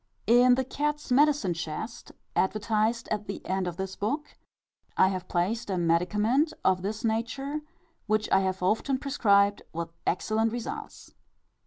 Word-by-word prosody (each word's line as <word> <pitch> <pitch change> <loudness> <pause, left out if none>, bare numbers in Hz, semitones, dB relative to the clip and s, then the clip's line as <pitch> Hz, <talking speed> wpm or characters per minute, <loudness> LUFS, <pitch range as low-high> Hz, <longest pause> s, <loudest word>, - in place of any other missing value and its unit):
In 245 +2 +6
the 260 - 0
"Cat's 295 +2 -3
Medicine 275 - +4
Chest," 165 +7 -6 0.2
advertised 215 +3 +1
at 210 -1 -2
the 200 - -4
end 190 0 -1
of 175 -1 -5
this 190 0 -4
book, 285 +9 -3 0.6
I 190 - +5
have 185 -2 -4
placed 205 +6 -1
a 190 - 0
medicament 210 - +2
of 185 -1 +3
this 210 +4 -4
nature, 245 +6 -1 0.5
which 215 0 +1
I 195 - +6
have 190 -1 -1
often 225 +8 +1
prescribed 205 -7 +3
with 165 0 -5
excellent 220 +5 +1
results. 240 -1 -6
215 Hz, 145 wpm, -28 LUFS, 190-245 Hz, 0.6 s, In